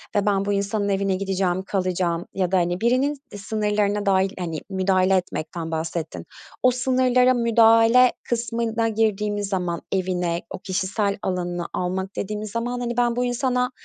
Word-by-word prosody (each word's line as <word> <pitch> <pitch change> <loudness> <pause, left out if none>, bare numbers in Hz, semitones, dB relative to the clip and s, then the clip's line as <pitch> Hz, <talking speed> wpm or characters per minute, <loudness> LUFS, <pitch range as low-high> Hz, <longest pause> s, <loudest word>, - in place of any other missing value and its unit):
ve 205 - +2
ben 200 -1 +1
bu 205 - 0
insanın 200 +1 -1
evine 195 -1 +1
gideceğim, 190 -1 -1
kalacağım 180 -3 -1
ya 185 -2 -1
da, 190 - +3
hani, 175 +2 0
birinin 255 +5 +2 0.2
sınırlarına 210 0 -1
dâhil 190 -1 +3
hani 165 -3 -3
müdahale 190 0 +2
etmekten 165 -2 -4
bahsettin. 160 0 -4 0.4
O 255 - +6
sınırlara 255 0 +3
müdahale 230 +1 +5
kısmına 230 -1 -1
girdiğimiz 210 -2 0
zaman 180 -3 -2
evine, 180 -2 -1
o - - -7
kişisel 195 +2 -1
alanına 175 -2 -2
almak 190 +2 -3
dediğimiz 210 +1 -4
zaman, 240 +2 -2
hani, 240 -1 -3
"Ben 240 -1 +2
bu 245 +1 0
insana 250 0 0
200 Hz, 145 wpm, -23 LUFS, 185-230 Hz, 0.4 s, O